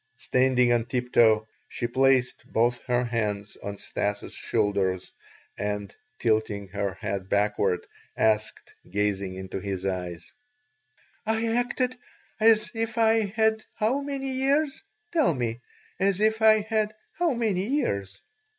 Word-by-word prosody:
Standing 125 -1 +3
on 115 -1 +1
tiptoe, 115 -3 +3 0.2
she - - -3
placed 130 +1 +2
both 120 +2 +2
her 125 0 +2
hands 105 -4 -2
on 100 0 -5
Stas' 100 +1 -3
shoulders 95 -3 -1 0.5
and, 105 -1 -3 0.2
tilting 110 -3 0
her 100 -1 -2
head 95 -1 -4
backward, 100 -3 +1 0.3
asked, 110 -1 0 0.2
gazing 100 -1 -1
into 95 0 -5
his 95 -1 -4
eyes: 90 -3 -4 0.9
"I 220 +1 0
acted 245 +1 0 0.4
as 215 -1 +4
if 225 0 -2
I 225 -1 +4
had 220 +2 +1
how 235 +6 +1
many 275 -1 -3
years? 275 +3 +1 0.3
Tell 305 - +3
me! 120 -2 -2 0.4
As 195 0 +2
if 220 +1 +2
I 220 -1 +6
had 215 0 -1 0.2
how 345 -4 +2
many 210 -5 0
years?" 100 - -1
125 Hz, 125 wpm, -26 LUFS, -, 0.9 s, I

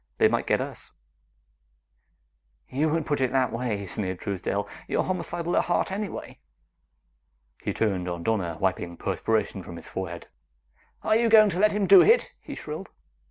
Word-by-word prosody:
"They - - +6
might - - 0
get - - +3
us!" - - -8 1.7
"You 150 +4 0
would 160 0 0
put 145 -2 -1
it 130 - +1
that 130 -2 +2
way," 115 -4 -2
sneered 95 +1 -3
Truesdale; 100 +1 -2 0.2
"you're - - +1
homicidal 175 -2 -2
at - - +3
heart 175 +1 0
anyway!" 200 +1 -5 1.2
He - - -2
turned 95 -5 -1
on 85 -1 -4
Donna, 90 -7 -1
wiping 85 -3 -1
perspiration 110 -3 -1
from 85 - -9
his 85 - -10
forehead. 85 -3 -5 0.8
"Are 215 - +3
you 230 +1 +3
going 215 -2 +7
to 180 - -3
let 210 0 +4
him 205 -1 +1
do 195 -1 +9
it?" 470 +2 +4
he 285 - -8
shrilled. 155 - -7
125 Hz, 160 wpm, -26 LUFS, -, 1.7 s, do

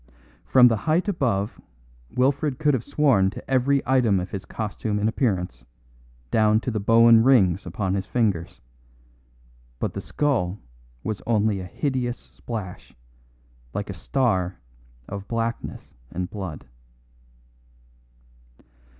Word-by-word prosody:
From 125 -2 +7
the 115 -2 +2
height 170 +6 +2
above 115 - -1 0.5
Wilfred 135 +2 +1
could 150 -1 +2
have 125 -3 0
sworn 135 -10 +3
to - - -10
every 135 +1 +2
item 125 -7 +3
of 90 - -5
his 95 - -5
costume 105 -1 -3
and 105 +1 +1
appearance, 90 - -1 0.7
down 110 0 +4
to 125 - -2
the 110 - -1
Bohun 115 +2 +6
rings 100 -9 +4
upon 95 +2 -2
his 95 -1 -2
fingers; 100 -9 -1 1.2
but - - -2
the - - -4
skull 115 -11 0 0.5
was 105 - -3
only 110 -3 +2
a 90 - -6
hideous 125 - -2
splash, 105 -7 -8 0.8
like 100 -1 -3
a - - -5
star 95 -2 0 0.5
of 100 0 -7
blackness 115 0 -4 0.2
and 90 0 -4
blood. 90 -9 -6
110 Hz, 125 wpm, -24 LUFS, 95-130 Hz, 1.2 s, From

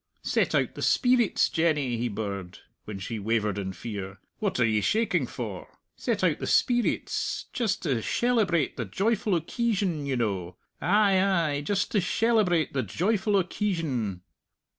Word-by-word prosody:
"Set - - +1
out - - +1
the - - -8
speerits, 245 -4 +3
Jenny," 150 -6 +1
he 120 +1 -1
birred, 100 -4 -5 0.3
when 105 -2 -6
she 105 +4 -5
wavered 105 -1 0
in 95 -1 -3
fear. 100 -1 -6 0.2
"What 205 -10 -1
are 120 - +5
ye 110 -2 +2
shaking 225 - +1
for? - - -6 0.3
Set - - -2
out - - +2
the - - -4
speerits 245 -2 +1
just 225 -7 -1
to 135 -9 0
shelebrate 205 - +1
the 115 - -2
joyful 200 - +1
occeesion, 190 - -1
ye 135 - 0
know 95 -7 -2 0.3
ay, 200 -3 +4
ay, 165 -7 +1
just 195 +6 -1
to 210 - +3
shelebrate 185 - +2
the 135 - +1
joyful 190 - 0
occeesion!" 165 - -1
160 Hz, 150 wpm, -27 LUFS, -, 0.3 s, are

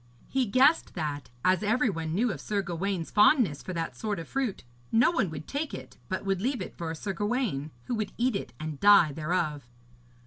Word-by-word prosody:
He 265 -2 0
guessed 270 +9 +3
that, 150 -4 -3 0.2
as 185 +1 +4
every 225 +2 +2
one 165 -2 -3
knew 230 +4 +2
of - - -6
Sir 205 -2 -1
Gawaine's 180 -1 -3
fondness 210 - +4
for - - -6
that 165 -7 -3
sort 210 - -3
of 165 - -6
fruit, 265 -7 -2 0.3
no 240 +8 +5
one 225 - +1
would 155 -1 -7
take 290 +2 -3
it, - - -10
but 185 +1 -3
would 195 -1 0
leave 255 +3 0
it 185 - -6
for 165 -1 -4
Sir 195 +5 -4
Gawaine, 205 - -1 0.2
who - - -3
would 215 -3 -2
eat 245 -1 +1
it - - -4
and 155 -2 -5
die 200 -6 +7
thereof. 150 -4 -2
195 Hz, 205 wpm, -28 LUFS, 165-235 Hz, 0.3 s, die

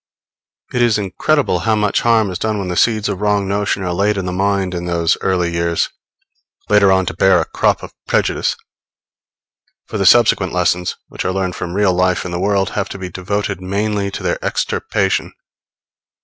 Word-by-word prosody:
It 125 - +1
is 120 -3 +3
incredible 130 +9 0
how 110 -1 +1
much 105 -1 +1
harm 110 -4 +2
is 90 - -5
done 110 -1 -1
when 95 -2 -3
the 90 - -2
seeds 110 +1 +2
of 100 -2 -3
wrong 105 -1 +1
notions 100 -1 -1
are 90 - -1
laid 100 +3 +1
in 95 - -2
the 90 - -2
mind 95 0 0
in 90 0 -4
those 85 -1 +1
early 90 -3 0
years, 85 0 0 0.8
later 105 -2 +5
on 95 0 +3
to 80 - -3
bear 95 +1 +4
a 80 - 0
crop - - 0
of - - -9
prejudice; - - +1 1.3
for 105 - -5
the 100 - +3
subsequent 105 -4 +4
lessons, 90 0 0
which - - -6
are 95 - 0
learned 95 -1 -2
from 85 +1 -5
real 100 -2 +3
life 90 0 +1
in 90 - -5
the 85 - -3
world 100 0 +1
have 100 -1 -2
to - - -7
be 95 -1 -6
devoted 100 +2 -3
mainly 100 +1 -1
to 100 - -7
their - - -2
extirpation. - - -1
95 Hz, 190 wpm, -17 LUFS, 90-105 Hz, 1.3 s, later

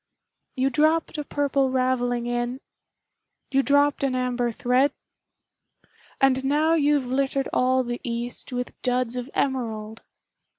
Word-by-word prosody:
You 265 +1 +1
dropped 310 +2 +1
a - - -2
Purple 280 -2 0
Ravelling 250 -2 0
in 240 +1 -2 0.9
You 270 0 +4
dropped 285 +1 +2
an 265 -2 +1
Amber 245 -1 0
thread 255 +5 +2 1.3
And 265 -1 +3
now 300 +4 +2
you've 290 -3 +2
littered 270 +1 0
all 255 +1 +2
the 240 0 -5
east 240 +1 -4
With 250 0 -4
Duds 250 -1 0
of 250 +1 -4
Emerald! 225 -5 -2
255 Hz, 125 wpm, -24 LUFS, 245-275 Hz, 1.3 s, You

